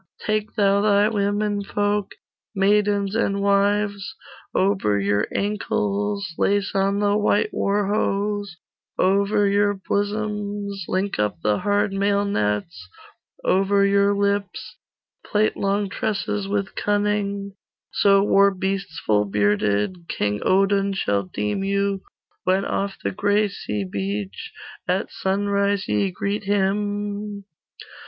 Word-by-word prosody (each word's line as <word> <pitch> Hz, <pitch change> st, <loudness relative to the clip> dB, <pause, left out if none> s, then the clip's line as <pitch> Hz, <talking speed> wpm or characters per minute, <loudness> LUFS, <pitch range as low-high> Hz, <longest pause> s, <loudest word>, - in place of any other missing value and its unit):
Take 215 Hz, 0 st, -1 dB
thou 200 Hz, -2 st, +3 dB
thy 205 Hz, 0 st, +4 dB
women 205 Hz, -1 st, 0 dB
folk, 205 Hz, 0 st, -1 dB, 0.4 s
Maidens 200 Hz, 0 st, +2 dB
and 200 Hz, -3 st, +1 dB
wives: 200 Hz, 0 st, +1 dB, 0.4 s
Over 190 Hz, -, +1 dB
your 100 Hz, +1 st, +1 dB
ankles 205 Hz, -2 st, -1 dB
Lace 200 Hz, 0 st, +1 dB
on 195 Hz, +1 st, +1 dB
the 205 Hz, 0 st, +2 dB
white 210 Hz, 0 st, +1 dB
war 200 Hz, +1 st, +1 dB
hose; 205 Hz, -1 st, -1 dB, 0.4 s
Over 200 Hz, +2 st, +2 dB
your 205 Hz, 0 st, +2 dB
bosoms 205 Hz, -1 st, -3 dB
Link 190 Hz, -, -1 dB
up 105 Hz, -5 st, 0 dB
the 105 Hz, -1 st, +2 dB
hard 205 Hz, 0 st, +1 dB
mailnets; 105 Hz, -, 0 dB, 0.6 s
Over 200 Hz, +1 st, +3 dB
your 200 Hz, 0 st, +3 dB
lips 200 Hz, -, -2 dB, 0.5 s
Plait 215 Hz, +1 st, +1 dB
long 200 Hz, +1 st, 0 dB
tresses 210 Hz, -1 st, -2 dB
with 200 Hz, 0 st, -2 dB
cunning; 205 Hz, -1 st, -1 dB, 0.4 s
So 195 Hz, -1 st, +4 dB
war 200 Hz, -1 st, +5 dB
beasts 190 Hz, -2 st, -3 dB
full 105 Hz, -1 st, +3 dB
bearded 105 Hz, -, 0 dB
King 105 Hz, 0 st, -1 dB
Odin 195 Hz, +1 st, +2 dB
shall 100 Hz, -, 0 dB
deem 105 Hz, -, -2 dB
you, 200 Hz, 0 st, 0 dB, 0.4 s
When 190 Hz, +2 st, +1 dB
off 200 Hz, 0 st, -2 dB
the -, -, 0 dB
gray 205 Hz, +2 st, +1 dB
sea 105 Hz, -, -4 dB
beach 100 Hz, +1 st, -4 dB, 0.4 s
At -, -, -1 dB
sunrise 200 Hz, +1 st, 0 dB
ye 200 Hz, -, +1 dB
greet 200 Hz, +2 st, -3 dB
him. 205 Hz, +1 st, -1 dB
200 Hz, 115 wpm, -23 LUFS, 190-205 Hz, 0.6 s, war